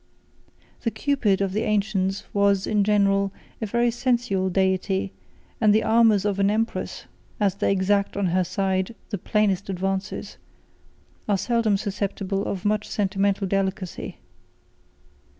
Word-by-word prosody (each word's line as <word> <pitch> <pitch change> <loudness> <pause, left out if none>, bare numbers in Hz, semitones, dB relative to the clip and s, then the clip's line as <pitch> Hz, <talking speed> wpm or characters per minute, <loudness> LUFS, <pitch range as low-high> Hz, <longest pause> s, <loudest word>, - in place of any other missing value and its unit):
2 - - -26
The - - +3
Cupid 220 -4 +1
of 195 -1 0
the 215 - 0
ancients 200 -3 0
was, 200 -1 +3
in 210 -2 +2
general, 200 -1 +2 0.3
a 220 - -1
very 235 +3 +2
sensual 235 -6 0
deity; 190 +1 0 0.5
and 210 -2 +5
the 220 - +4
amours 220 -3 +4
of 200 -1 0
an 195 0 +3
empress, 225 +2 -2 0.3
as 200 -3 +2
they 200 - 0
exact 200 +1 +1
on 200 - +1
her 185 0 +3
side 190 +3 -1 0.2
the 205 - -2
plainest 200 -1 0
advances, 190 +1 -3 0.9
are 200 - +3
seldom 225 0 +1
susceptible 195 0 -2
of 190 -1 -4
much 210 0 0
sentimental 200 0 0
delicacy. 190 -1 -2
200 Hz, 135 wpm, -24 LUFS, 195-215 Hz, 0.9 s, and